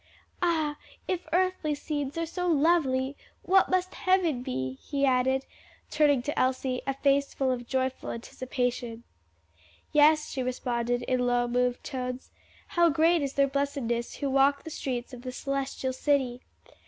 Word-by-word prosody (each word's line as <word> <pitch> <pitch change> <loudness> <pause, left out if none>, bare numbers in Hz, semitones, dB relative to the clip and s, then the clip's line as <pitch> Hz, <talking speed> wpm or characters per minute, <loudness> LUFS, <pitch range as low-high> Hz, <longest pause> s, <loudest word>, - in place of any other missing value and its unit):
"Ah, 315 -4 +1 0.3
if 365 -1 -2
earthly 360 -4 +1
scenes 290 0 -4
are 330 - 0
so 360 +2 -3
lovely, 285 -4 +2 0.3
what 385 0 +4
must 370 0 0
heaven 360 -8 +1
be!" 130 - -4
he 280 -2 0
added, 260 +1 +2 0.5
turning 290 -4 +3
to 290 - -2
Elsie 255 0 0
a 270 - 0
face 280 0 +1
full 265 -1 +1
of 245 -1 -3
joyful 260 0 -1
anticipation. 240 -1 -3 0.9
"Yes," 305 +1 +5
she 265 - -2
responded 245 -1 -1
in 250 0 0
low, 245 0 +2
moved 245 0 0
tones, 250 -1 -5 0.4
"how 345 -1 +4
great 325 +2 +3
is 275 -1 -2
their 275 0 +3
blessedness 275 -4 -2
who 280 - -2
walk 275 +1 +3
the 320 - -8
streets 255 -3 -4
of 245 - -8
the 255 0 -5
Celestial 270 0 -3
City! 255 -3 0
270 Hz, 150 wpm, -28 LUFS, 250-300 Hz, 0.9 s, Yes